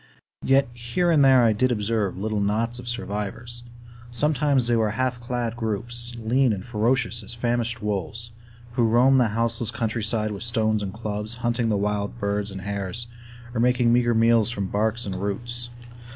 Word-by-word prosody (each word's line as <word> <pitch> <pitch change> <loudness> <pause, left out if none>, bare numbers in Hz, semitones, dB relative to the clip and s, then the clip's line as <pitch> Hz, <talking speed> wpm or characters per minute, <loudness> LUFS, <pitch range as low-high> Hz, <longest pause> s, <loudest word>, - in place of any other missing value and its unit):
Yet 135 +1 +4
here 120 +9 0
and 150 -4 +5
there 130 -2 +6
I 115 -2 +4
did 130 +4 +1
observe 105 -3 -1
little 105 +2 -1
knots 110 +4 0
of 125 - -9
survivors. 120 +1 -4 0.5
Sometimes 140 0 +2
they 120 0 +3
were 110 -2 +2
half 125 +3 -1
clad 120 -1 -3
groups, 120 +2 -2
lean 120 +2 +2
and 95 -1 -5
ferocious 120 +1 0
as 115 +3 -7
famished 120 -1 -1
wolves, 105 +3 -3 0.4
who 120 -1 +2
roamed 125 +4 +5
the 120 - +4
houseless 115 +1 0
countryside 110 -1 -1
with 100 - -6
stones 110 -2 +1
and 100 -2 -3
clubs, 105 +1 -4
hunting 120 -1 +1
the 105 - +1
wild 105 +2 -1
birds 100 -1 -1
and 95 -1 -7
hares, 100 +3 -3 0.5
or 120 - -2
making 125 0 +3
meager 120 -1 +3
meals 115 0 +4
from 100 -5 -2
bark 110 +4 0
and 95 -2 -4
roots. 120 +4 -3
115 Hz, 170 wpm, -24 LUFS, 105-120 Hz, 0.5 s, there